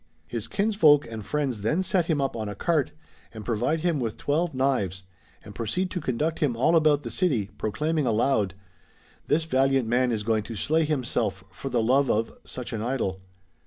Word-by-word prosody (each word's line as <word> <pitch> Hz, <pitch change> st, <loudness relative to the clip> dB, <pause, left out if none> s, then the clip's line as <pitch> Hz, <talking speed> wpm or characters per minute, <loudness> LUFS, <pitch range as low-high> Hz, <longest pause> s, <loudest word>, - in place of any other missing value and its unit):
His 110 Hz, +5 st, -4 dB
kinsfolk 195 Hz, -8 st, +4 dB
and 110 Hz, -2 st, -6 dB
friends 135 Hz, -4 st, -2 dB
then 155 Hz, -, +1 dB
set 180 Hz, -2 st, +1 dB
him 160 Hz, -4 st, +1 dB
up 135 Hz, -2 st, -1 dB
on 110 Hz, -2 st, -3 dB
a 105 Hz, -, -6 dB
cart, 155 Hz, -, +1 dB, 0.4 s
and 110 Hz, -3 st, -9 dB
provide 125 Hz, +8 st, 0 dB
him 170 Hz, -3 st, +1 dB
with 115 Hz, -4 st, -3 dB
twelve 160 Hz, +1 st, 0 dB
knives, 125 Hz, -9 st, 0 dB, 0.4 s
and 105 Hz, -, -10 dB
proceed 180 Hz, -, -2 dB
to 180 Hz, -, -3 dB
conduct 150 Hz, +5 st, -1 dB
him 140 Hz, -6 st, +1 dB
all 160 Hz, +8 st, +3 dB
about 150 Hz, -3 st, +4 dB
the -, -, -5 dB
city, 125 Hz, -, 0 dB
proclaiming 150 Hz, +7 st, 0 dB
aloud: 110 Hz, -4 st, +1 dB, 0.4 s
" -, -, -32 dB
This 160 Hz, +2 st, +2 dB
valiant 135 Hz, -4 st, +2 dB
man 125 Hz, +2 st, +2 dB
is 110 Hz, -2 st, -1 dB
going 110 Hz, 0 st, +1 dB
to 115 Hz, -, -6 dB
slay 160 Hz, +9 st, +1 dB
himself 125 Hz, -9 st, -1 dB
for 135 Hz, -, -6 dB
the 120 Hz, -3 st, +1 dB
love 135 Hz, +4 st, +3 dB
of 110 Hz, +2 st, 0 dB
(such 125 Hz, -1 st, -6 dB
an 110 Hz, -, -3 dB
idol)." 110 Hz, -6 st, -2 dB
130 Hz, 195 wpm, -26 LUFS, 110-155 Hz, 0.4 s, kinsfolk